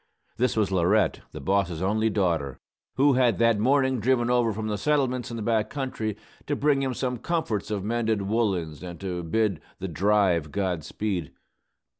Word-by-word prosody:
This 125 -1 +1
was 105 -3 +1
Laurette, 90 -3 +2
the - - -8
boss's 90 0 0
only 110 +4 +1
daughter, 85 -10 0 0.4
who 140 +1 +4
had 125 -5 +3
that 115 -2 +3
morning 130 +2 +2
driven 120 +1 +2
over 120 -2 +3
from 110 +1 -4
the 105 -1 -2
settlements 130 -3 0
in 115 - -5
the 110 - -4
back 110 -1 +1
country, 120 -7 -3 0.3
to 145 - 0
bring 140 -1 +2
him 130 -2 -1
some 125 -1 -2
comforts 120 - -2
of 105 -3 -2
mended 110 -1 0
woollens 95 -8 -1
and 90 -1 -8
to 90 -2 -3
bid 95 0 0 0.2
"the 95 - -4
drive" 90 -3 +2
God 95 -5 -1
speed. 95 -3 -3
110 Hz, 175 wpm, -26 LUFS, 95-125 Hz, 0.4 s, who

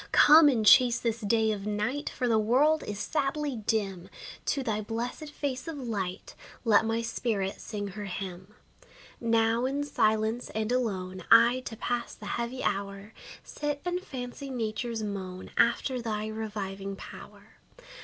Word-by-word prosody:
Come, 305 0 +8
and 230 -6 +1
chase 240 +2 +7
this 230 -1 -2
day 220 +1 +2
of 205 -1 -4
night, 215 +7 -1
For 250 - -2
the 225 -2 +3
world 275 +9 +3
is 210 - -4
sadly 285 +3 -1
dim. 200 -4 -2 0.4
To 275 - 0
thy 215 -3 -1
blessed 235 +7 -4
face 280 -1 -4
of 325 -2 -5
light 205 -8 -4 0.3
Let 220 -1 +5
my 225 +1 0
spirit 220 -4 -2
sing 205 -1 -5
her 205 +2 -7
hymn. 190 +1 -7 0.6
Now, 230 +1 +2
in 275 +2 -1
silence 220 -3 +1
and 220 +1 -1
alone, 185 -7 -2
I, 235 +2 +7
to 225 - -6
pass 240 +1 -3
the 210 - -11
heavy 235 +4 -3
hour, 200 +1 -3 0.3
Sit 295 -1 -3
and 355 0 -1
fancy 260 -2 -7
nature's 230 -2 -3
moan 190 -3 -5
After 245 +2 +2
thy 215 -2 -2
reviving 200 -3 -5
power. - - -12
225 Hz, 150 wpm, -29 LUFS, 205-250 Hz, 0.6 s, Come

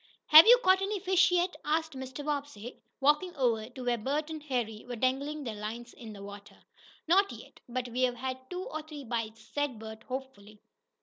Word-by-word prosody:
"Have 310 +4 +11
you - - +10
caught 375 +1 +5
any 400 +1 -1
fish 375 0 +4
yet?" 360 0 +1
asked 320 +1 0
Mr. 265 +2 -7
Bobbsey, 280 -6 -5 0.2
walking 300 +6 +2
over 230 -5 0
to 255 0 -9
where 240 -1 0
Bert 295 +7 -2
and 310 -1 -6
Harry 240 -7 -3
were 245 - -4
dangling 275 +5 -1
their 230 -4 -4
lines 225 +3 -7
in 225 -2 -10
the 200 -1 -10
water. 200 0 -11 0.5
"Not 390 +4 +4
yet, - - -12
but 250 +1 -3
we've 250 +1 0
had 260 +1 -6
two 360 +1 -4
or 310 -3 -5
three 300 -2 -9
bites," 225 -2 -4
said 290 -5 -1
Bert, 220 0 -9
hopefully. 250 -6 -8
260 Hz, 190 wpm, -30 LUFS, 230-305 Hz, 0.5 s, Have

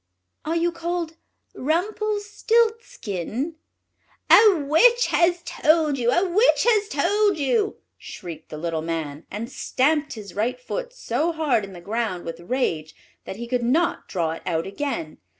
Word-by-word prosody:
"Are 320 +2 -1
you 340 +1 +1
called 335 -1 -4 0.4
Rumpelstiltskin?" 410 - -1 0.8
"A 425 -3 +8
witch 480 - +5
has 345 0 +2
told 310 -4 +2
you! 240 -1 +1
a 350 +9 +3
witch 420 +8 +3
has 420 -3 +3
told 415 -3 +2
you!" 405 - +1 0.2
shrieked 165 -3 -9
the 155 - -7
little 165 0 -2
Man, 160 -2 -4
and 215 +4 -5
stamped 295 +3 0
his 205 -5 -9
right 225 - -1
foot - - -5
so 345 -9 -1
hard 305 -9 +1
in 195 -1 -8
the 175 - -10
ground 210 -2 -3
with 165 0 -6
rage 170 - -2 0.3
that - - -6
he 235 +3 -6
could 245 +1 -1
not 295 +9 +1
draw 165 -3 -1
it 165 - -6
out 165 -2 0
again. 200 - -4
290 Hz, 150 wpm, -23 LUFS, -, 0.8 s, A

